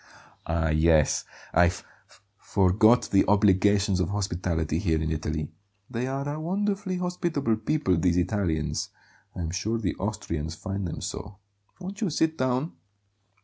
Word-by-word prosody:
"Ah, 80 -1 0
yes! 80 -1 +3 0.3
I 90 - +6
f 90 - -4 0.6
forgot 105 +5 +3
the 100 - +5
obligations 100 -1 +3
of 90 -1 0
hospitality 85 -5 -1
here 80 -5 +1
in 80 0 -1
Italy; 80 -1 -3 0.4
they 120 +2 -2
are 135 +1 -3
a 145 +2 -3
wonderfully 195 +2 -1
hospitable 170 - -1
people, 145 -2 +1
these 85 +1 +2
Italians. 90 -4 -1 0.5
I'm 85 -2 -3
sure 105 +6 -1
the 105 -6 -1
Austrians 85 -6 -3
find 95 +1 -4
them 80 - -5
so. 100 -1 -6 0.4
Won't 195 +3 -7
you 205 - +1
sit 160 +1 +1
down?" 130 +3 0
100 Hz, 140 wpm, -27 LUFS, 85-135 Hz, 0.6 s, I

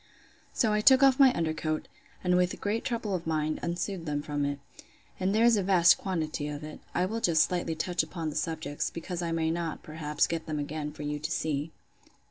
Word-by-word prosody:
So 220 -4 +1
I 210 - +2
took 265 +4 +7
off 270 -1 +5
my 270 -2 +8
under 160 -2 0
coat, 155 0 -3 0.4
and 180 -1 +3
with 180 0 +1
great 215 +3 -1
trouble 230 -4 -2
of 175 -3 -3
mind, 155 -1 0
unsewed 170 0 -3
them 145 -1 -1
from 145 -1 -1
it. 140 0 -2 0.6
And 190 +2 +1
there 225 +2 +4
is 235 -2 +5
a - - +2
vast 180 -2 +5
quantity 160 -5 -2
of 150 0 -6
it. 155 0 -8 0.2
I 180 - +2
will 225 +4 -3
just 165 -5 +4
slightly 175 -2 -2
touch 175 +2 0
upon 160 0 -4
the - - -9
subjects; 155 -2 -2
because 175 +1 -5
I 170 -1 -2
may 160 -1 0
not, 165 -1 -3
perhaps, 150 -1 -1
get 165 -1 -4
them 155 -1 -2
again 150 +1 -4
for 150 - -8
you 150 0 -3
to 155 +2 -4
see. 155 -1 -2
165 Hz, 220 wpm, -29 LUFS, 155-185 Hz, 0.6 s, my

